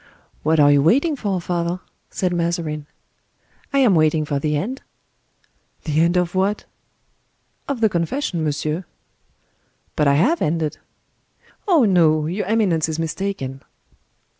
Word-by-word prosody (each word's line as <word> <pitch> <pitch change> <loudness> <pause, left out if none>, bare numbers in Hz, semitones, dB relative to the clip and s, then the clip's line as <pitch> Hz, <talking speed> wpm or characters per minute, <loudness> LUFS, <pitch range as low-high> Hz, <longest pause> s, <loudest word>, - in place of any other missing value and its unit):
"What 160 +1 +2
are 145 -1 +6
you 145 -1 +4
waiting 280 - +3
for, 200 -8 -2
father?" 175 0 -2 0.3
said 180 -2 -1
Mazarin. 165 -3 -2 0.8
"I 280 - 0
am 255 -7 +5
waiting 155 -1 +2
for 145 -1 -1
the 150 +1 0
end." 245 - -4 1.0
"The 155 0 +1
end 170 +2 +2
of 180 -1 0
what?" 195 +2 0 1.0
"Of 275 -4 -3
the 220 - +5
confession, 170 - -2
monsieur." 155 +3 -2 1.1
"But 150 - +2
I 140 - +4
have 275 - +2
ended." 155 -1 -1 0.9
"Oh, 330 - +5
no; 160 -6 +3
your 180 +4 -3
eminence 190 -8 +1
is 160 - -3
mistaken." 165 -5 -4
170 Hz, 135 wpm, -21 LUFS, 155-200 Hz, 1.1 s, are